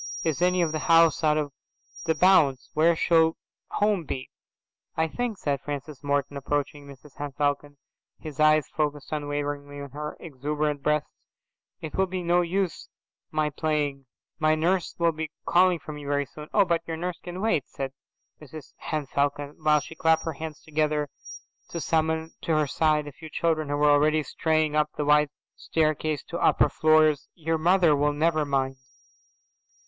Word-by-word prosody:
"Is 160 0 -1
any 180 0 +3
of 160 - 0
the 155 - -2
house 165 -1 +5
out 155 -1 +3
of 150 -2 -1 0.7
bounds?"' 150 -8 +4
"Where 165 +2 +4
shall 160 0 +3 0.3
home 205 -4 +1
be?"' 130 -3 -6 0.7
"I 160 0 +2
think," 235 +4 -3
said 140 -5 -2
Francis 145 0 -6
Morton, 140 0 -1
approaching 145 +1 -3
Mrs 140 +1 -14
Henne 145 -1 -5
Falcon, 145 0 -1 0.4
his 155 -3 -9
eyes 155 -1 +4
focused 150 -2 -3
unwaveringly 145 -1 -3
on 140 -1 -8
her 150 +2 -6
exuberant 150 -1 -3
breasts, 150 +1 0 0.7
"it 155 - -6
will 190 0 +1
be 185 0 -4
no 175 +1 +3
use 180 0 -2 0.4
my 155 -1 0
playing. 145 -3 -2 0.3
My 155 0 +3
nurse 175 +3 0
will 170 -1 +3
be 160 0 -5 0.2
calling 180 0 +4
for 155 - -9
me 150 -1 -8
very 145 0 0
soon." 150 +2 -11
"Oh, 200 - +4
but 170 -2 +1
your 165 -1 -3
nurse 180 +1 -4
can 175 +1 -7
wait, 190 - +1
Francis," 135 0 -6 0.4
said - - -38
Mrs 150 -1 -11
Henne 155 -2 -3
Falcon, 145 +1 -1
while 150 -1 +4
she 155 - -9
clapped 160 0 +2
her 165 - -2
hands 155 +1 -7
together 150 -1 -1 0.6
to 170 - -4
summon 160 0 0
to 165 - -1
her 155 -1 +3
side 150 +1 +1
a 145 - -7
few 160 +3 -11
children 155 -2 0
who 145 - 0
were 150 0 +4
already 155 +1 +3
straying 155 +2 0
up 150 0 +2
the 150 - -1
wide 150 0 +4 0.3
staircase 155 -1 -1
to 170 - -6
upper - - +4
floors. 155 -2 +3
"Your 165 -1 -1
mother 175 -1 +4
will 145 +1 +1
never 155 0 +1
mind." 135 -1 -1
155 Hz, 175 wpm, -26 LUFS, 145-160 Hz, 0.7 s, house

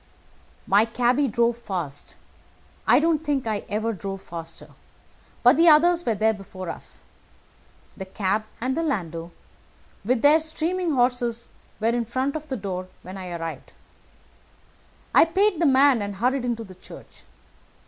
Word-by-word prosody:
"My 200 +2 +4
cabby 245 +4 +1
drove 235 0 +1
fast. 175 -11 -5 0.7
I - - +6
don't 320 -1 +1
think 285 -5 -1
I 215 -2 -2
ever 220 +2 -1
drove 195 -1 -6
faster, 165 -1 -8 0.7
but 245 +3 +6
the 335 +1 +7
others 340 +3 +5
were 225 - +2
there 220 +2 +2
before 185 -3 -8
us. - - -7 0.9
The 190 - -7
cab 200 +2 -1
and 255 +3 -1
landau 175 - -2 0.7
with 235 +3 0
their 300 +2 +7
steaming 325 +2 -1
horses 245 -2 0 0.3
were 220 +1 +1
in 235 0 0
front 260 +5 -2
of 310 0 -5
the 265 -3 -3
door 185 -3 -5 0.2
when 185 +1 -9
I 185 -2 -7
arrived. 165 -1 -6 1.4
I - - +8
paid 370 +1 +1
the 330 - +4
man, 270 -3 +5
and 205 0 -4
hurried 250 +5 0
into 235 -2 -2
the 190 -3 -12
church. 185 - -14
235 Hz, 150 wpm, -24 LUFS, 195-285 Hz, 1.4 s, I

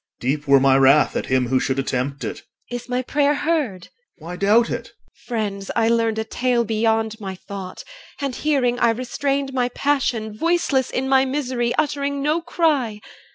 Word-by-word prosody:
OR. - - -68
Deep 145 +4 -2
were 140 0 +6
my 135 0 +4
wrath 135 +2 +5
at - - -2
him 130 -2 +1
who 130 0 +3
should 130 0 -1
attempt 135 +1 -2
it. - - -5 0.3
EL. - - -3
Is 245 0 -7
my 250 +1 -1
prayer 290 +2 +1
heard? 285 - -1 0.3
OR. 165 +1 -11
Why 180 - -5
doubt 210 +5 +3
it? - - -4
EL. - - -27
Friends, 205 -5 -3
I 225 -1 +3
learned 230 -1 +1
A 220 - 0
tale 245 +1 0
beyond 220 0 0
my 190 -1 -5
thought; 190 0 -8 0.4
and 280 -3 -2
hearing 255 -5 +1
I 235 - +4
restrained 270 +3 -1
My 250 -1 +1
passion, 245 -6 -1
voiceless 305 -2 +1
in 265 +1 -2
my 265 0 +4
misery, 255 -3 -1
Uttering 280 -2 -1
no 305 +3 +1
cry. 290 -11 0
235 Hz, 190 wpm, -21 LUFS, 195-275 Hz, 0.4 s, were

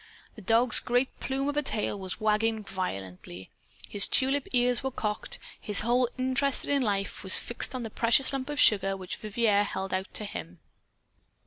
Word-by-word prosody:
The 220 - -12
dog's 225 +4 +3
great 245 +2 -1
plume 270 +1 -2
of 290 - -2
a 295 - +2
tail 215 -6 -2
was 190 +1 -5
wagging 215 0 0
violently. 95 - -6 0.4
His 200 - +3
tulip 270 +1 +1
ears 245 -1 +2
were 265 - -1
cocked. 210 -5 -4 0.2
His 205 -1 +3
whole 240 +2 +1
interest 260 +2 0
in 285 -1 +1
life 200 -4 -2
was 190 - +4
fixed 240 +2 0
on 250 - -4
the 225 - -6
precious 235 +5 +2
lump 270 +1 -4
of 295 0 -3
sugar 195 -5 +4
which 185 -1 -6
Vivier 215 -1 +1
held 190 -2 -4
out 190 +1 -3
to 210 - 0
him. 85 - -8
225 Hz, 180 wpm, -28 LUFS, 195-255 Hz, 0.4 s, was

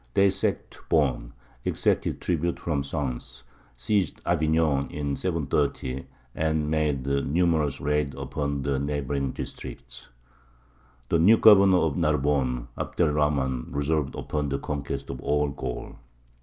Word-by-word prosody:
They 100 0 +5
sacked - - -2
Beaune, 65 -6 +1 0.3
exacted - - 0
tribute 85 0 -1
from 75 -5 -1
Sens, 70 -3 -4 0.3
seized 90 - 0
Avignon 80 -4 +2
in 70 -1 -3
730, 70 -6 -1 0.3
and 80 -1 0
made 75 -4 0
numerous 75 +1 +1
raids 75 -1 0
upon 70 0 -3
the 70 -1 0
neighbouring 70 -1 -2
districts. - - -8 1.0
The 85 - +3
new 105 +7 +6
governor 100 -4 +7
of 80 -5 +1
Narbonne, 70 -6 +1
Abd - - -5
er 75 - +3
Rahmān, 70 -4 0
resolved 70 0 0
upon 75 -1 -2
the 70 - -1
conquest 70 0 -4
of - - -7
all 75 0 +1
Gaul. 65 -3 -6
75 Hz, 125 wpm, -26 LUFS, 70-80 Hz, 1.0 s, governor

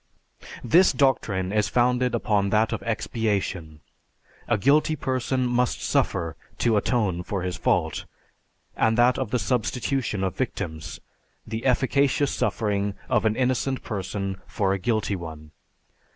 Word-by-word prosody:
This 170 +10 +5
doctrine 115 -8 +1
is 105 -1 +1
founded 125 +1 +2
upon 100 -3 +1
that 110 +2 +2
of - - -3
expiation; 100 -9 -2 0.7
a 120 - +2
guilty 145 +7 +3
person 130 -1 -1
must 125 0 0
suffer 85 -3 0 0.2
to 115 -2 +2
atone 105 -4 +1
for 95 +1 -3
his 90 -1 -2
fault; - - 0 0.7
and 115 0 +2
that 120 +1 +4
of 130 -5 -2
the 125 - +1
substitution 120 -1 -1
of 95 -2 -1
victims, 80 -1 -4 0.5
the 110 +3 -3
efficacious 140 +2 +2
suffering 100 -2 -1
of 115 -4 +2
an 110 0 +2
innocent 130 +1 0
person 100 -2 -4
for 95 -3 0
a 100 - -2
guilty 110 0 0
one. 80 -3 -8
110 Hz, 135 wpm, -25 LUFS, 100-125 Hz, 0.7 s, This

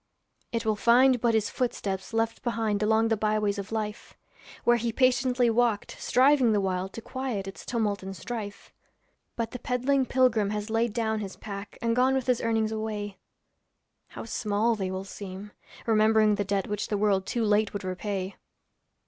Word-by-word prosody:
It 230 -1 -2
will 215 -1 +2
find 245 +3 +4
but 235 -2 +3
his 215 -1 +1
footsteps 195 -6 -2
left 225 0 -1
behind 225 -4 -1
Along 220 +1 +3
the 225 - +3
byways 210 -1 0
of 200 +2 -6
life, 215 -1 -4 0.5
Where 240 0 +4
he 235 0 -1
patiently 250 0 +2
walked, 225 -2 +1
striving 260 -2 +4
the 205 - +3
while 190 -1 -1
To 230 - -9
quiet 250 -7 -4
its 195 - -8
tumult 215 -4 -1
and 190 0 -7
strife. 205 +2 -7 0.6
But 230 -1 -3
the 250 - -6
peddling 255 +2 +1
pilgrim 240 -6 +3
has 210 +1 -3
laid 225 0 +1
down 220 -1 0
his 195 -2 -6
pack 200 -1 -8
And 230 0 +1
gone 260 +2 +3
with 265 -2 -1
his 250 -2 +1
earnings 225 -1 +1
away; 215 -2 -4 0.9
How - - -8
small 215 +1 0
will 190 -3 -3
they - - -14
seem, 200 +1 -8 0.3
remembering 220 -1 +4
the 205 0 -1
debt 195 -1 0
Which 210 0 -2
the 210 - -1
world 200 -2 +1
too 235 - -1
late 210 0 +2
would 205 - -5
repay. 185 +1 -4
220 Hz, 175 wpm, -27 LUFS, 205-235 Hz, 0.9 s, find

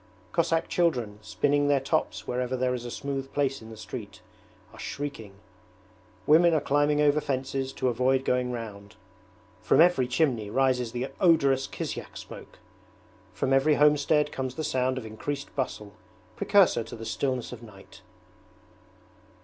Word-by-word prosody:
Cossack 165 0 +1
children, 120 -12 0
spinning 145 +6 +1
their 145 -1 +3
tops 135 - -1
wherever 125 +1 -2
there 125 0 0
is 120 -1 -5
a - - -5
smooth 135 +1 -4
place 135 -2 0
in 110 - -11
the 110 - -10
street, 105 -3 -8 0.5
are - - -14
shrieking; 140 -8 -6 0.9
women 165 +2 +5
are - - +3
climbing 145 +1 +1
over 150 0 +3
fences 135 0 -2
to 130 - -1
avoid 130 +2 +1
going 125 0 +1
round. 105 -3 -7 0.7
From - - +3
every 165 -7 +5
chimney 125 -6 0
rises 125 -1 +1
the 125 +3 -3
odorous 140 -6 +3
kisyak - - -6
smoke. - - -11 0.7
From 100 +9 -1
every 140 +3 +4
homestead 150 0 +3
comes 130 -1 -4
the 155 - -3
sound 130 -2 0
of 125 - -5
increased 140 +6 -6
bustle, 105 -6 -4 0.4
precursor 195 - +3
to - - -8
the 115 0 -8
stillness 130 0 -2
of 120 -2 -9
night. 105 -4 -14
130 Hz, 150 wpm, -27 LUFS, 120-145 Hz, 0.9 s, women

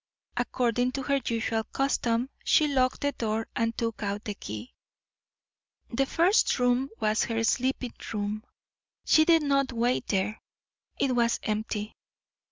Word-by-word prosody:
According 245 0 0
to 270 - -3
her 275 +1 +1
usual 225 -1 -1
custom, 250 -2 0
she 305 - +4
locked 260 -3 +1
the 285 - +1
door 225 -3 -2
and 230 -1 0
took 230 -2 -2
out 205 0 -2
the 210 - -2
key. 110 - -8 1.2
The 270 +3 +1
first 355 +9 +3
room 250 +1 +2
was 215 0 +2
her 225 -1 -1
sleeping 255 +1 0 0.2
room. 210 0 -3 0.6
She 315 - +5
did 330 -2 +5
not 275 -2 +2
wait 240 +1 0
there; 200 +2 -1 0.6
it 260 -2 +2
was 235 -1 +2
empty. 215 0 -3
240 Hz, 140 wpm, -28 LUFS, 220-265 Hz, 1.2 s, She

